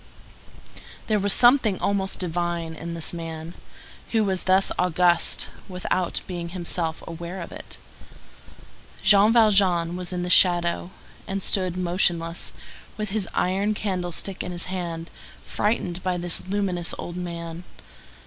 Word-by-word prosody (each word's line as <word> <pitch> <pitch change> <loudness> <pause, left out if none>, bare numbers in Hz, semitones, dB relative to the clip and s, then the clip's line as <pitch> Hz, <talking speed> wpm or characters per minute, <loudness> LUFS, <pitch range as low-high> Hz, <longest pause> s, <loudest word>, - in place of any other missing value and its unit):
There 215 -1 +1
was 200 +1 +3
something 240 -5 +5
almost 195 -1 +1
divine 175 -1 -2
in 170 +1 -6
this 165 0 0
man, 165 -1 -6 0.6
who 220 -1 +3
was 190 -3 -1
thus 190 +1 +4
august, 175 -1 +3 0.2
without 180 -1 -2
being 175 -2 -5
himself 170 -2 -1
aware 170 +3 -6
of 170 - -7
it. - - -9 1.3
Jean 205 +1 +6
Valjean 195 -7 +4
was 180 0 -4
in 180 -1 -2
the 180 - -3
shadow, 175 -1 +4 0.4
and 195 0 -3
stood 185 -2 0
motionless, 175 -2 0 0.5
with 215 -1 -3
his 205 -3 -2
iron 200 +4 +1
candlestick 185 -1 -3
in 180 - -5
his 175 -1 0
hand, 170 -3 -5 0.3
frightened 185 -4 -1
by 185 -1 -1
this 175 +1 -2
luminous 185 -3 -1
old 175 - -6
man. 170 -1 -6
180 Hz, 130 wpm, -24 LUFS, 170-195 Hz, 1.3 s, Jean